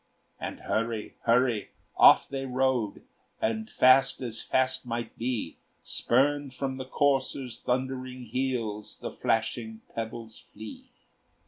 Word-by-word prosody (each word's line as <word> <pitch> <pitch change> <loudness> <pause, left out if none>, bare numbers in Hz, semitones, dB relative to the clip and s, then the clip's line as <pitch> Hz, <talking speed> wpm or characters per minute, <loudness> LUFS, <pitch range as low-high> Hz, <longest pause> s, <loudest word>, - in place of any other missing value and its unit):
And, - - -5
hurry! 110 -1 -2
hurry! 120 -2 +3 0.3
off - - +7
they 135 -1 -4
rode, 130 -4 0 0.4
And 110 0 -1
fast 130 +1 +5
as 115 -2 -5
fast 130 0 +1
might 120 -1 -4
be; 115 -8 -3 0.3
Spurned 140 +1 +2
from 135 0 -3
the 130 - -5
courser's 135 -3 0
thundering 130 0 -2
heels 115 -3 -2
The - - -5
flashing 110 0 -1
pebbles 110 0 -6
flee. 110 +1 -11
125 Hz, 115 wpm, -28 LUFS, 110-130 Hz, 0.4 s, off